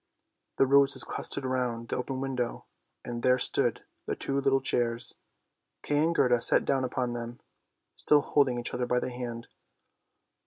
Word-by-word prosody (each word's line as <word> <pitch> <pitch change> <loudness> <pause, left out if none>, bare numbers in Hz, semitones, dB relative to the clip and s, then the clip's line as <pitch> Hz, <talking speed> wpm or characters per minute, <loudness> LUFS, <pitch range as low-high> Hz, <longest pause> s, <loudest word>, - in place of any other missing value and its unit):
The - - +4
roses 140 +1 +4
clustered 140 - -2
round 125 -3 -2
the - - -1
open 130 +1 -4
window, 130 -3 -3 0.4
and 120 -1 -5
there 125 +1 +3
stood 125 - 0 0.2
their - - -1
two 140 0 -2
little 135 -1 +2
chairs. 120 -2 +1 0.7
Kay 145 0 0
and 165 +2 +1
Gerda 125 -5 +3
sat - - +3
down 135 -1 +1
upon 125 -1 -2
them, 120 0 -6 0.6
still 150 -1 +3
holding 140 -4 +1
each 120 - -4
other 125 0 -2
by 125 0 +1
the 125 - -4
hand. 120 -1 -6
125 Hz, 160 wpm, -28 LUFS, 120-135 Hz, 0.7 s, The